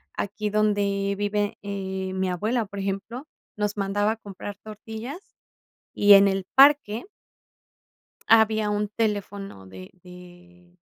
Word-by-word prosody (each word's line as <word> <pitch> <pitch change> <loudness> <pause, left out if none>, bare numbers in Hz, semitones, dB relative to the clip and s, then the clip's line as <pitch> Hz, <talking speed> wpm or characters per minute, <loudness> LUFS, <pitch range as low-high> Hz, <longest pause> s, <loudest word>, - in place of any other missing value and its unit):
aquí 210 +1 -3
donde 200 -1 0
vive, 205 +1 -1
eh, 190 -2 -4
mi 190 0 -1
abuela, 215 +6 -1
por 200 0 -8
ejemplo 200 +8 -4 0.3
nos 210 0 -2
mandaba 205 +2 0
a - - -9
comprar 205 -1 -9
tortillas 220 - -9 0.6
y 205 0 +6
en 200 0 +8
el 195 -1 -1
parque 270 -5 +5 1.3
había 220 -1 +4
un 210 0 -1
teléfono 200 - -3
de 95 0 -11
de 180 0 -16
205 Hz, 120 wpm, -25 LUFS, 195-215 Hz, 1.3 s, en